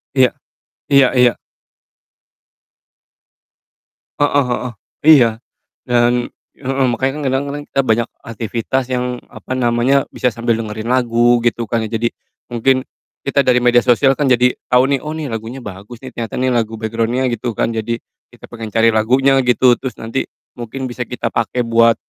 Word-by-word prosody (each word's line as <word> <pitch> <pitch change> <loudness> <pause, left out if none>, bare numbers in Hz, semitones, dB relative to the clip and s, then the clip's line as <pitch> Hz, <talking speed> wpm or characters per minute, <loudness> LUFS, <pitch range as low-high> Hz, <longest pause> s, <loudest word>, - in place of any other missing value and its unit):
Iya. 130 -2 +4 0.6
Iya 135 -2 +6
iya. 120 -1 +5 2.9
Heeh 145 -2 +3
heeh. 125 0 -2 0.3
Iya, 145 -7 +7 0.6
dan 120 0 +2 0.3
mhm, 135 0 -1
makanya 135 +4 -2
kadang-kadang 140 +2 -2
kita 135 - +1
banyak 115 -1 +1 0.2
aktivitas 115 +3 -3
yang, 125 0 -2
apa - - -12
namanya, 125 +3 +2
bisa 125 - +1
sambil 115 +1 -1
dengerin 110 -1 -5
lagu 120 -1 +3
gitu 120 0 0
kan 115 +1 0
ya, 110 - -4
jadi 115 +1 0 0.4
mungkin 130 +2 +1 0.4
kita 140 +1 +3
dari 125 -1 +3
media 120 0 +5
sosial 130 +2 +4
kan 145 -1 0
jadi 125 0 +4 0.2
tau 125 +1 +5
nih, 140 -1 0
"Oh, 150 - -4
nih 155 -3 -4
lagunya 115 +4 -5
bagus 100 +3 -9
nih 130 -2 -9
ternyata 115 -1 -4
nih 130 0 +1
lagu 115 -2 0
background-nya." 115 +3 -1
Gitu 120 -1 -3
kan. 115 - 0
Jadi 115 +1 -2 0.3
kita - - -15
pengen 115 -1 -6
cari 115 +2 +3
lagunya 130 +5 +3
gitu, 125 0 +3
terus 130 - -5
nanti 115 +4 -3 0.3
mungkin 125 +2 -5
bisa 125 0 -5
kita 125 - -3
pake 120 +1 -1
buat 115 0 +4
120 Hz, 155 wpm, -17 LUFS, 115-130 Hz, 2.9 s, Iya